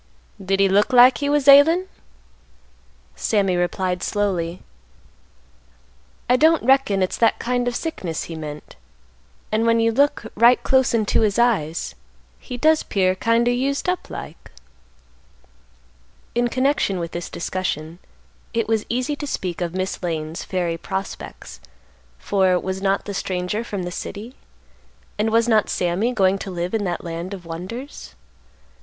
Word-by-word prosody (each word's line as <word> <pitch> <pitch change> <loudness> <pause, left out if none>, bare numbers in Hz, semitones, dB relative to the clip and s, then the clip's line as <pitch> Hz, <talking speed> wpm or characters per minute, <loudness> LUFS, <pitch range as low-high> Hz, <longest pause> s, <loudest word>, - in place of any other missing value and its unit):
"Did 195 +1 0
he 195 - +5
look 205 +5 +2
like 250 +1 +7
he 285 - -1
was 290 -1 +1
ailin'?" 310 +6 +7 1.3
Sammy 195 -4 +1
replied 180 +1 -1
slowly, 180 -5 -2 1.6
"I 250 - +4
don't 320 +3 +4
reckon 245 -7 +3
it's 185 - -2
that 230 - +3
kind 245 0 -1
of 245 - -1
sickness 185 - -4
he 170 - -8
meant; 150 -1 -8 0.7
and 220 +1 +1
when 230 0 +3
you 230 0 +3
look 280 +4 +2
right 235 +3 +5
close 265 -3 +3
into 215 -1 +1
his 210 -1 +1
eyes, 205 -10 +1 0.5
he 250 - -7
does 310 +4 +3
'pear 185 -2 +1
kind 230 +5 +1
o' - - +4
used 270 +5 -1
up 360 0 -2
like." - - -9 1.8
In 240 +1 +1
connection 255 -5 0
with 170 -1 -4
this 175 0 -5
discussion, 170 -2 -4 0.6
it 230 - 0
was 220 -1 0
easy 255 +5 -1
to 290 - -5
speak 180 -9 -4
of 175 0 -3
Miss 185 +1 -3
Lane's 160 -1 -4
fairy 175 -3 -2
prospects, 195 +2 -6 0.6
for, 185 - +1
was 190 +1 -4
not 195 0 0
the 205 - -5
stranger 185 +3 -2
from 200 -5 -5
the 175 - -5
city? 215 +7 -7 0.9
and 215 +1 +2
was 230 +1 +2
not 220 -3 +3
Sammy 180 +7 0
going 195 -4 +2
to 195 - -6
live 175 +1 -4
in 215 -3 0
that 175 -2 -3
land 170 +3 -5
of 180 -3 -13
wonders? 180 - -8
200 Hz, 150 wpm, -22 LUFS, 180-245 Hz, 1.8 s, like